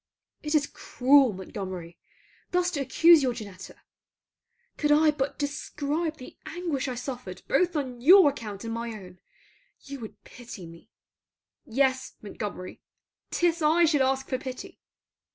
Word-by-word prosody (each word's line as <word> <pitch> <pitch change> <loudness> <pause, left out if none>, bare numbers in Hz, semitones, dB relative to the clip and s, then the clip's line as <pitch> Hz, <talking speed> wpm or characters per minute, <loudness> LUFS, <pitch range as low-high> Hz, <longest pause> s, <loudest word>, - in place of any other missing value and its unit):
It 300 +1 -2
is 295 -1 +3
cruel, 270 -2 +3
Montgomery, 185 -3 -7 0.5
thus 360 0 +1
to 310 - -3
accuse 320 +4 +5
your 255 -2 0
Janetta. 200 -5 -9 1.0
Could 295 -1 0
I 305 +1 +5
but 280 -2 -3
describe 295 +2 -3
the 255 - -11
anguish 320 -5 -3
I 255 - -3
suffered 245 -7 -7
both 350 +5 +2
on 255 -5 -3
your 350 +2 +8
account 215 -7 -8
and 225 0 -4
my 230 0 -4
own, 185 -4 -11 0.6
you 280 -1 -9
would 220 -2 -10
pity 230 -7 -11
me. 165 0 -14 0.8
Yes, 260 +2 0
Montgomery; 200 -3 -7 0.5
'tis 340 -1 +1
I 320 +3 +4
should 300 -3 +2
ask 265 0 +1
for 255 - -2
pity. 260 -1 -8
265 Hz, 140 wpm, -27 LUFS, 225-300 Hz, 1.0 s, your